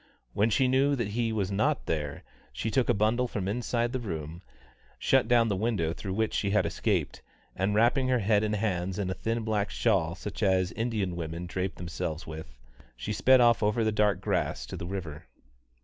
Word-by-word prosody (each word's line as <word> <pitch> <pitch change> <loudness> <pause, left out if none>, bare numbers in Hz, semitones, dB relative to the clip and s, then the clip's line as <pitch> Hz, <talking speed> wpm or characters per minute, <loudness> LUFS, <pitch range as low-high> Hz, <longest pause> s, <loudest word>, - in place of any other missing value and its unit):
When 105 +3 +2
she 130 +4 +3
knew 135 +2 +3
that 120 -6 -2
he 115 +2 -1
was 100 -3 -1
not 130 +9 +1
there, 75 -3 -3 0.3
she 110 - -3
took 125 +3 +1
a - - +5
bundle 110 +5 +2
from 100 -5 -3
inside 120 +2 -1
the 130 - -1
room, 80 -6 -5 0.6
shut 135 -3 +3
down 120 -1 +4
the 100 - 0
window 95 -6 0
through 95 +1 -5
which 110 0 0
she 100 - 0
had 105 +2 +2
escaped, - - -1 0.3
and 95 +3 0
wrapping 120 +4 +3
her 130 -1 +3
head 105 -1 +2
and 105 0 0
hands 95 -3 -1
in 95 -3 -1
a - - 0
thin 115 +4 -2
black 105 -2 0
shawl 90 -8 +1
such 105 +3 -7
as 95 -3 +2
Indian 110 -6 -2
women 85 +1 -5
drape 95 +1 -3
themselves 85 -2 -4
with, 80 -5 -9 0.4
she 105 - -3
sped 130 +4 +5
off 120 -1 +5
over 105 +2 +2
the 110 - +2
dark 105 -2 +2
grass - - -1
to - - -7
the 85 - -6
river. 85 -5 -6
105 Hz, 200 wpm, -28 LUFS, 90-115 Hz, 0.6 s, a